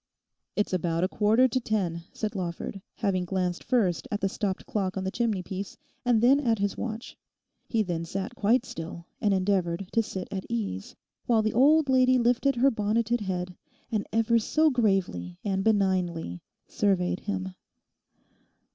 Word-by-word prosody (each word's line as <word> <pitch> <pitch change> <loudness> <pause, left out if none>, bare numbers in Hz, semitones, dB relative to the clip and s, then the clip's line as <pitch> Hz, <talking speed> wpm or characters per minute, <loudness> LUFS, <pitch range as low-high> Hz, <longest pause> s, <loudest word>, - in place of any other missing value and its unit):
'It's 205 -2 0
about 170 -1 0
a - - +3
quarter 220 +6 +3
to 255 +1 0
ten,' 190 -8 -1
said 215 -2 -3
Lawford, 185 +1 -4
having 195 -4 0
glanced 180 -1 -2
first 225 -9 +1
at 205 - -2
the 195 - +1
stopped 195 -1 -3
clock 195 -3 -2
on 190 - -2
the 190 - -2
chimney 220 -6 0
piece 190 +2 -6 0.3
and 240 -3 +3
then 270 +4 +6
at 230 -5 +1
his 200 -1 -1
watch. 225 0 -5 0.5
He 225 -2 +1
then 170 -3 -3
sat 195 +7 -4
quite 240 +2 +2
still 170 -2 -7 0.2
and 205 - +3
endeavoured 185 -2 0
to 230 - +3
sit 190 -4 -5
at 190 -1 -4
ease, 95 -5 -3 0.3
while 225 -2 +3
the 215 - 0
old 290 +5 +5
lady 255 -1 +4
lifted 250 +3 +2
her 265 +3 +4
bonneted 225 +2 0
head 180 -2 -3 0.4
and 215 -3 -1
ever 225 +1 +3
so 310 +7 +2
gravely 190 - 0
and 195 -1 0
benignly 185 - +1 0.2
surveyed 185 -2 +1
him. 190 -2 -4
200 Hz, 165 wpm, -27 LUFS, 185-230 Hz, 0.5 s, then